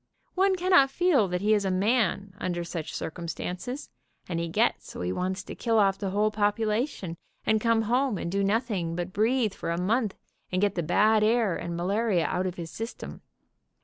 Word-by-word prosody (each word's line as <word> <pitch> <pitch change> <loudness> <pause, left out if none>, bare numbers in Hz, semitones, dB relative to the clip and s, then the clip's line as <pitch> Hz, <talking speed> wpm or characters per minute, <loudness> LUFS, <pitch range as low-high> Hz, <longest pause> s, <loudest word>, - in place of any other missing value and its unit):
One 385 0 +3
cannot 360 -6 +4
feel 290 - +3
that 180 0 -2
he 210 +2 +3
is 205 -1 +2
a 195 - 0
man 195 0 +1
under 175 -1 -2
such 170 -2 -5
circumstances, 180 - -5 0.4
and 170 -2 -2
he 170 - -2
gets - - +1
so - - -7
he 90 0 -1
wants 185 - -2
to - - -8
kill 230 -2 0
off 195 -2 +3
the 195 - -2
whole 210 +2 +1
population 210 - -1 0.3
and 220 -1 +2
come 230 -1 +3
home 245 0 +1
and 170 - -4
do 200 +1 +1
noth 225 +4 +1
ing 170 -4 -2
but 175 +1 -4
breathe 220 0 +2
for - - -5
a 170 +1 -1
month, 210 +3 0 0.4
and 185 - 0
get 205 0 +2
the 175 - -1
bad 215 +6 +3
air 220 -4 +2
and 170 0 -4
malaria 195 0 +1
out 185 +1 0
of 180 - -4
his 165 -3 -7
system. 225 +2 -7
205 Hz, 200 wpm, -27 LUFS, 180-225 Hz, 0.4 s, cannot